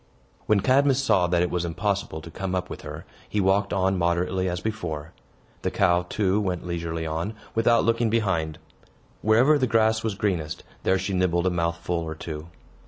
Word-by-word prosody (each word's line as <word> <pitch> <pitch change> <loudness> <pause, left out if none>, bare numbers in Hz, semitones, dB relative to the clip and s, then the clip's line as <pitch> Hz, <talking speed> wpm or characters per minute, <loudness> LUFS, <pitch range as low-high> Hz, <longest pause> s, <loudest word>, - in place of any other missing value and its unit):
When 105 -2 +4
Cadmus 135 +2 +4
saw 100 -10 +3
that 90 0 +2
it 90 - -1
was 90 -1 0
impossible 90 -1 -2
to 85 - -10
come 95 +2 -3
up 90 0 -3
with - - -6
her, - - -8 0.2
he 105 - -1
walked 100 +1 +2
on 95 -1 +1
moderately, 90 +2 +1
as 90 0 -2
before. 85 -8 -4 0.5
The - - 0
cow, 90 0 +2
too, 100 0 +1
went 90 -4 -2
leisurely 85 -1 -3
on, 80 +7 -3 0.2
without 115 +1 +3
looking 115 0 +2
behind. 95 -9 0 0.6
Wherever 125 +8 +4
the 130 - +2
grass 110 -1 +2
was 110 -3 -1
greenest, 90 -5 -2 0.2
there 95 - +2
she 95 +1 -3
nibbled 90 -1 +1
a 95 - +3
mouthful 85 0 -1
or 80 -1 -4
two. 80 0 -7
95 Hz, 180 wpm, -25 LUFS, 85-105 Hz, 0.6 s, When